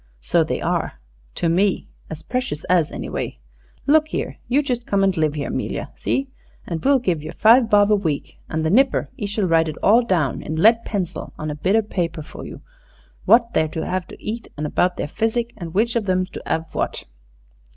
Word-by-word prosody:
"So -, -, +2 dB
they -, -, -2 dB
are -, -, -1 dB, 0.4 s
to 170 Hz, -, 0 dB
me 185 Hz, +4 st, +1 dB, 0.2 s
as 160 Hz, -1 st, -7 dB
precious 245 Hz, -, -3 dB
as, 170 Hz, -4 st, +2 dB
anyway. -, -, -4 dB, 0.5 s
Look 310 Hz, +2 st, +4 dB
here, -, -, -4 dB
you 280 Hz, +4 st, +2 dB
just 245 Hz, -4 st, -2 dB
come 200 Hz, -1 st, +2 dB
and 195 Hz, -1 st, +2 dB
live 155 Hz, -2 st, 0 dB
'ere, 145 Hz, -, -3 dB
'Melia -, -, -3 dB
see? 270 Hz, +1 st, -1 dB, 0.4 s
An' 165 Hz, -2 st, -3 dB
we'll 275 Hz, +1 st, +5 dB
give 180 Hz, -, -1 dB
yer 155 Hz, -, -7 dB
five 230 Hz, +1 st, +5 dB
bob 205 Hz, 0 st, +5 dB
a -, -, +6 dB
week. 160 Hz, -8 st, -3 dB
An' 160 Hz, 0 st, -1 dB
the 160 Hz, -, +1 dB
nipper 265 Hz, +5 st, +3 dB
'e 205 Hz, -, -4 dB
shall 205 Hz, 0 st, -1 dB
write 165 Hz, -2 st, +3 dB
it 155 Hz, -, -6 dB
all 225 Hz, +4 st, +6 dB
down 170 Hz, -, 0 dB
in 155 Hz, -, -4 dB
lead 225 Hz, +7 st, +4 dB
pencil 190 Hz, -6 st, -4 dB
on 155 Hz, 0 st, -4 dB
a -, -, -4 dB
bit 185 Hz, +7 st, +1 dB
o' 225 Hz, -, +3 dB
paper 170 Hz, -6 st, -3 dB
for -, -, -10 dB
you, -, -, -10 dB, 0.6 s
what 235 Hz, 0 st, +5 dB
they're 155 Hz, -, +2 dB
to 160 Hz, +1 st, -4 dB
'ave 185 Hz, -1 st, -2 dB
to -, -, -12 dB
eat 225 Hz, +2 st, -5 dB
an' 150 Hz, -, -3 dB
about 180 Hz, +4 st, +1 dB
their -, -, -2 dB
physic 230 Hz, +6 st, -1 dB
and 170 Hz, -2 st, -8 dB
which 230 Hz, +3 st, +2 dB
of 215 Hz, -4 st, 0 dB
'em's 185 Hz, 0 st, +1 dB
to -, -, -7 dB
have 160 Hz, 0 st, -2 dB
what." -, -, -2 dB
190 Hz, 215 wpm, -22 LUFS, 160-230 Hz, 0.6 s, a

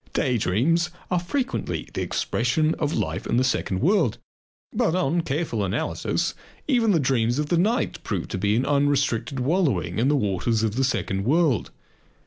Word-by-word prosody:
Day 125 Hz, -4 st, +1 dB
dreams 160 Hz, -, +1 dB, 0.2 s
are 180 Hz, -, +2 dB
frequently 255 Hz, +9 st, -3 dB
the -, -, -2 dB
expression 155 Hz, -1 st, 0 dB
of 150 Hz, -2 st, 0 dB
life -, -, -2 dB
in 115 Hz, -, +1 dB
the 130 Hz, -, +3 dB
second 100 Hz, -7 st, -1 dB
world. 175 Hz, -, +2 dB, 0.6 s
But 165 Hz, -, +1 dB
on 175 Hz, -1 st, +1 dB
careful 145 Hz, -8 st, -2 dB
analysis 100 Hz, +4 st, -1 dB, 0.3 s
even 240 Hz, -6 st, +3 dB
the 180 Hz, -5 st, +4 dB
dreams 120 Hz, -3 st, +1 dB
of 150 Hz, 0 st, -1 dB
the 175 Hz, -, +2 dB
night 220 Hz, +7 st, 0 dB
prove 95 Hz, -5 st, -3 dB
to 95 Hz, -, -3 dB
be 100 Hz, +2 st, +2 dB
an 125 Hz, -, +1 dB
unrestricted 140 Hz, -3 st, +1 dB
wallowing 125 Hz, -, 0 dB
in 120 Hz, -, +2 dB
the 145 Hz, -, +3 dB
waters 110 Hz, -1 st, 0 dB
of 110 Hz, -1 st, 0 dB
the 135 Hz, -, +1 dB
second 95 Hz, -6 st, -1 dB
world. 145 Hz, -, +2 dB
135 Hz, 170 wpm, -24 LUFS, 115-170 Hz, 0.6 s, the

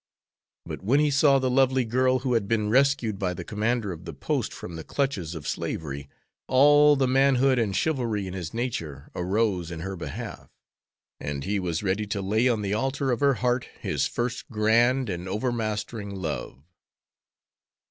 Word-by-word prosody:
But -, -, -6 dB
when 120 Hz, +9 st, +3 dB
he 150 Hz, -1 st, +3 dB
saw 140 Hz, 0 st, +5 dB
the 130 Hz, -1 st, 0 dB
lovely 130 Hz, -1 st, +3 dB
girl 130 Hz, +3 st, +2 dB
who 125 Hz, -, +1 dB
had 110 Hz, -4 st, +1 dB
been 105 Hz, -1 st, 0 dB
rescued 130 Hz, -5 st, +2 dB
by 90 Hz, -2 st, -1 dB
the -, -, -6 dB
commander 110 Hz, 0 st, -1 dB
of 85 Hz, 0 st, -9 dB
the 85 Hz, -3 st, -7 dB
post 70 Hz, -, -2 dB
from 85 Hz, -, -8 dB
the 80 Hz, -, -6 dB
clutches 100 Hz, -, -2 dB
of 80 Hz, -, -7 dB
slavery, 70 Hz, -2 st, -4 dB, 0.4 s
all 145 Hz, +2 st, +6 dB
the 135 Hz, -2 st, +2 dB
manhood 135 Hz, 0 st, +3 dB
and 105 Hz, -4 st, 0 dB
chivalry 120 Hz, -10 st, 0 dB
in 95 Hz, -, -6 dB
his 90 Hz, -4 st, -5 dB
nature 80 Hz, -, -4 dB
arose 95 Hz, -1 st, 0 dB
in 85 Hz, -2 st, -6 dB
her 95 Hz, +2 st, -4 dB
behalf, 85 Hz, -, -7 dB, 0.7 s
and 70 Hz, -1 st, -4 dB
he 100 Hz, +1 st, -1 dB
was 85 Hz, -1 st, -2 dB
ready 100 Hz, +2 st, 0 dB
to 100 Hz, 0 st, -2 dB
lay 110 Hz, +6 st, +2 dB
on 110 Hz, -3 st, 0 dB
the 100 Hz, 0 st, -1 dB
altar 135 Hz, +4 st, 0 dB
of 120 Hz, -, 0 dB
her 140 Hz, -2 st, +3 dB
heart 125 Hz, +1 st, 0 dB, 0.2 s
his -, -, 0 dB
first 120 Hz, 0 st, -3 dB
grand 120 Hz, +4 st, +3 dB
and 90 Hz, -1 st, -4 dB
overmastering 110 Hz, -2 st, -3 dB
love. 75 Hz, -6 st, -5 dB
110 Hz, 175 wpm, -26 LUFS, 95-130 Hz, 0.7 s, all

